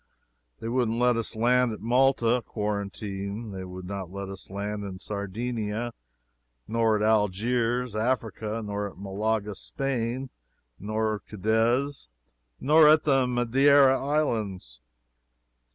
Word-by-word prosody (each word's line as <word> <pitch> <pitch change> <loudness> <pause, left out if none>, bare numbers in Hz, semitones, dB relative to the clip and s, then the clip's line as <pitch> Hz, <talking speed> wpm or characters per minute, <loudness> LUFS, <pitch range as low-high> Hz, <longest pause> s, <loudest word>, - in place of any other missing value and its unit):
They - - -5
wouldn't 115 -1 0
let 125 0 +3
us 115 0 -2
land 120 +1 +3
at - - -8
Malta 125 0 +3
quarantine; 100 0 -4
they 95 -1 -6
would 90 0 -8
not 95 -1 -5
let 100 0 -6
us 95 -1 -8
land 100 +2 -4
in 95 -2 -6
Sardinia; 110 +3 -3 0.7
nor 115 0 +2
at 105 - -1
Algiers, 115 +3 +1
Africa; 110 -1 -2
nor 105 0 -3
at - - -17
Malaga, 105 +2 -2
Spain, 130 +2 -3 0.5
nor 110 +1 -1
Cadiz, 115 - 0 0.5
nor 155 +2 +6
at 155 +1 +6
the 135 -3 +3
Madeira 135 +3 +4
islands. 110 - -2
110 Hz, 120 wpm, -27 LUFS, 100-125 Hz, 0.7 s, nor